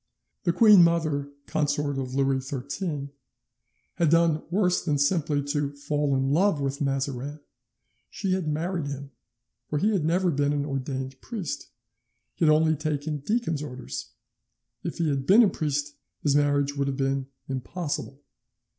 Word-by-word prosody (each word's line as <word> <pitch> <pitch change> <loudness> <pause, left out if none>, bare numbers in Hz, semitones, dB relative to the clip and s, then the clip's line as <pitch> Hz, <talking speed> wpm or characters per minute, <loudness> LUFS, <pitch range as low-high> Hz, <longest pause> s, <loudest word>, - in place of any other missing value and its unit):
"The 175 - +4
queen 205 0 +7
mother, 155 -4 +1 0.2
consort 145 -2 0
of 130 -1 -4
Louis 135 -1 +2
XIII, 140 +3 -4 0.9
had 170 -3 +3
done 165 -1 +4
worse 180 0 +2
than 150 -4 +1
simply 145 0 +1
to 145 -1 -1
fall 145 0 0
in 135 +1 +1
love 175 +1 +3
with 140 +1 -2
Mazarin, 135 +1 -2 0.7
she 195 -2 -2
had 185 -4 -1
married 160 +1 -1
him, 140 0 -6 0.6
for 150 - 0
he 210 +8 +2
had 185 -6 +1
never 175 +3 +2
been 145 0 +1
an 145 -1 -1
ordained 135 -1 -4
priest, 190 - -5 0.7
he 165 - 0
had 155 - +6
only 160 +1 +4
taken 150 0 -2
deacon's 165 - -1
orders. 130 - -6 0.7
If - - -4
he 170 - +1
had 140 -2 -1
been 215 +6 +8
a 210 - +4
priest 145 -3 -2 0.3
his 145 -2 +3
marriage 145 -1 +2
would 140 -1 0
have 135 -1 -2
been 135 -1 0 0.2
impossible. 140 +1 -4
145 Hz, 155 wpm, -26 LUFS, 140-165 Hz, 0.9 s, been